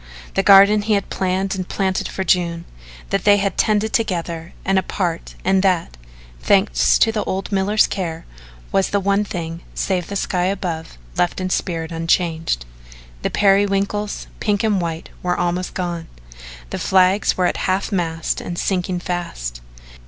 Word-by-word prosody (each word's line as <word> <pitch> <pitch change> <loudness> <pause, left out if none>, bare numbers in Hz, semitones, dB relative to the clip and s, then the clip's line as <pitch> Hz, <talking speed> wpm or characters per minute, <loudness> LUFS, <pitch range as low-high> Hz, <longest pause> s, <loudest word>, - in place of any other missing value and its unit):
The - - +2
garden 200 +2 +7
he 215 +1 0
had 200 -1 -1
planned 190 +1 0
and 185 -2 -4
planted 190 -2 -1
for 190 - -3
June 170 -2 +1 0.5
that - - 0
they 205 -1 +6
had 200 -1 -1
tended 215 0 +1
together 170 -6 -2
and 195 0 +3
apart 175 -3 -3
and 190 0 +3
that, 180 - +1 0.4
thanks 200 - +3
to 225 - +4
the 215 -1 -1
old 190 +2 -3
miller's 200 +2 +3
care, 165 -4 -4 0.5
was 195 - +2
the 205 - +1
one 200 +1 +2
thing, 170 -4 -5
save 180 -3 -1
the 200 - -5
sky 180 -2 0
above, 175 - -3 0.2
left 175 - +1
in 185 0 -2
spirit 165 -3 -2
unchanged. 165 - 0 0.6
The - - -1
periwinkles, 200 +1 +1
pink 205 -1 0
and 210 -4 +2
white, 165 -1 -4
were 180 0 0
almost 175 +1 -1
gone. 175 -2 -3 0.6
The - - -3
flags 190 +2 +3
were 180 - +2
at - - 0
half 190 +3 0
mast 165 -4 -1
and 175 - -5
sinking 180 -1 -1
fast. - - -4
185 Hz, 160 wpm, -20 LUFS, 170-200 Hz, 0.6 s, garden